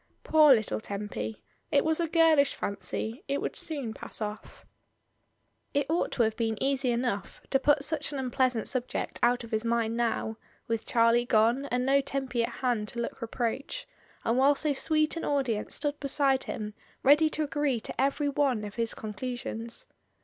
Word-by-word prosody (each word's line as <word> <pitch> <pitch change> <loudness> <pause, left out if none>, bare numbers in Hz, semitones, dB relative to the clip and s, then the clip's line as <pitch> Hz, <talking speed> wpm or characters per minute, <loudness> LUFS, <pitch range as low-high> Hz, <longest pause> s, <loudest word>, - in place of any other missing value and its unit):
Poor 310 -2 +6
little 220 -4 +3
Tempy, 200 - -5 0.3
it 285 0 +3
was 320 +1 +1
a 335 - +1
girlish 320 -3 +4
fanqr; 200 +4 -4
it 280 0 0
would - - -3
soon 280 -9 -2
pass - - -8
off..,. 210 -1 -6 1.1
It 285 -1 +2
ought 335 - +1
to 240 - +3
have 220 -1 0
been 225 -2 -1
easy 270 -1 +1
enough 235 -5 -2
to 270 - +4
put 290 +1 +3
such 305 0 +1
an 285 - -4
impleasant 255 -3 0
subject 255 -2 -2
out 245 0 +3
of 230 - -10
his 220 0 0
mind 230 -1 0
now, 225 -2 -1 0.3
with 230 -1 -2
Charlie 235 +1 +3
gone 235 +5 +3
and 250 0 0
no 275 +1 +4
Tempy 265 -3 -2
at - - -1
hand 240 -5 -1
to 235 - -4
look 235 - -4
re 230 - -3
proach, 260 - -3 0.4
and 235 +3 +2
while 280 +2 +5
so 295 +1 0
sweet 310 +3 +1
an - - -4
audience 260 -7 -1
stood 290 0 -2
be 280 - -3
side 270 -1 +2
him 210 -1 -5 0.3
ready 295 +3 +6
to 310 - 0
agree 290 -4 0
to - - -3
every 280 +2 +1
one 270 -6 +1
of 205 -1 -6
his 230 0 -2
con 215 -1 -6
clusions. 235 -1 -4
250 Hz, 185 wpm, -29 LUFS, 230-285 Hz, 1.1 s, Poor